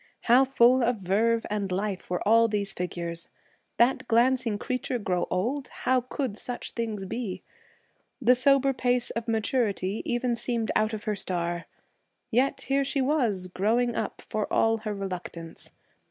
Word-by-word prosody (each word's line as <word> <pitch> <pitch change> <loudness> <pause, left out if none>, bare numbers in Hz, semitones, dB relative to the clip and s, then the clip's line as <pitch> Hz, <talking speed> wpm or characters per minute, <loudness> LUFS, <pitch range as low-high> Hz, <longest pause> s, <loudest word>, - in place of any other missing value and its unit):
How 250 +3 +5
full 255 -1 +4
of 240 +1 +2
verve 220 +5 +1
and 200 -2 -2
life 195 0 -3
were 180 +2 -2
all 230 +1 +6
these 205 -2 -1
figures! 170 -1 -4 0.5
That 240 +1 +3
glancing 235 -1 +2
creature 255 +2 -2
grow 185 -5 -1
old? 250 +10 -1
How 255 0 0
could 255 -2 -3
such 245 +1 -5
things 220 -4 -3
be! 210 -1 -4 0.8
The 250 -1 +5
sober 275 +1 +3
pace 245 -1 +1
of 230 0 -4
maturity 220 -3 0
even 240 0 0
seemed 230 -1 -1
out 215 +1 +2
of 215 - -5
her 215 - -1
star. 175 -3 -3 0.6
Yet 255 +4 +2
here 275 0 +1
she 275 +1 -1
was, 250 -10 +1
growing 220 +7 +1
up, - - -3
for 215 -1 -3
all 225 0 +3
her 215 -1 -4
reluctance. 180 -4 -6
225 Hz, 155 wpm, -27 LUFS, 195-250 Hz, 0.8 s, all